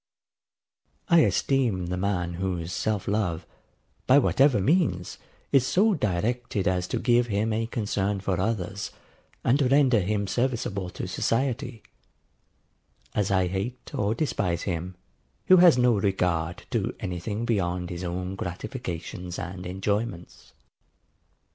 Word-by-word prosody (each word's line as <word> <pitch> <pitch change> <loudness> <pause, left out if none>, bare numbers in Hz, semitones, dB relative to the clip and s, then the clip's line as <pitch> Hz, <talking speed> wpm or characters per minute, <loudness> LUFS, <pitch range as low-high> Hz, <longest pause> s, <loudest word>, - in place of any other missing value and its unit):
I 170 -1 +7
esteem 125 - +2
the 90 +1 -2
man 90 -2 -1
whose 90 -1 -3
self 110 -3 -1
love, 90 -5 -1 0.6
by 130 - +7
whatever 135 -3 +4
means, 125 - +1 0.3
is 135 -3 +5
so 210 +4 +3
directed 110 - -1
as 90 -1 0
to - - -2
give 120 0 +3
him 110 +1 0
a 115 +1 -1
concern 105 -3 -1
for 95 -1 -1
others, 100 -1 -2 0.5
and 135 +5 +3
render 135 -5 +5
him 100 +2 0
serviceable 110 -4 -1
to 90 - -6
society: 115 +3 -1 1.3
as 105 -2 0
I 95 -2 +3
hate 100 +8 -4
or 105 +2 0
despise 100 - -1
him, 90 0 -3 0.5
who 185 - +7
has 175 -6 +7
no 125 -1 +4
regard 90 -4 0
to - - -1
any 90 -1 -4
thing 105 +6 -3
beyond 90 -5 -1
his 90 +1 -5
own 90 +1 -3
gratifications 90 - -5
and 90 +1 -6
enjoyments. 95 0 -3
100 Hz, 130 wpm, -26 LUFS, 90-120 Hz, 1.3 s, I